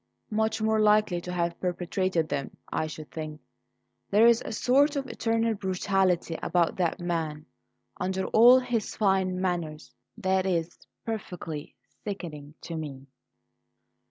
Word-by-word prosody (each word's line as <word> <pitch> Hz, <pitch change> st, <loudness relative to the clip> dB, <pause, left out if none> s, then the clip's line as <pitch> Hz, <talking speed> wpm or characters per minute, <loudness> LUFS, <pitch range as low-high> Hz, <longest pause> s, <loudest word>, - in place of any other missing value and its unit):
"Much 220 Hz, +1 st, +1 dB
more 220 Hz, 0 st, +2 dB
likely 210 Hz, -4 st, +3 dB
to 180 Hz, -, -6 dB
have 170 Hz, -1 st, -1 dB
perpetrated 180 Hz, -1 st, -1 dB
them, 140 Hz, -2 st, -4 dB, 0.2 s
I 155 Hz, -, 0 dB
should 155 Hz, 0 st, -9 dB
think. 155 Hz, -1 st, -6 dB, 0.7 s
There's 230 Hz, +3 st, +5 dB
a -, -, -6 dB
sort 275 Hz, +7 st, +3 dB
of 275 Hz, -1 st, -1 dB
internal 230 Hz, -1 st, 0 dB
brutality 190 Hz, -3 st, 0 dB
about 175 Hz, -2 st, +1 dB
that 175 Hz, -3 st, 0 dB
man, 160 Hz, -3 st, -2 dB, 0.5 s
under 190 Hz, +1 st, -1 dB
all 240 Hz, +3 st, +7 dB
his 245 Hz, -4 st, -1 dB
fine 190 Hz, -3 st, +1 dB
manners, 170 Hz, -4 st, -3 dB, 0.2 s
that 190 Hz, -2 st, +1 dB
is 170 Hz, -2 st, -1 dB, 0.3 s
perfectly 180 Hz, -8 st, -5 dB, 0.3 s
sickening 155 Hz, -7 st, -6 dB
to 170 Hz, -, -6 dB
me." 140 Hz, -4 st, -6 dB
185 Hz, 130 wpm, -28 LUFS, 165-215 Hz, 0.7 s, all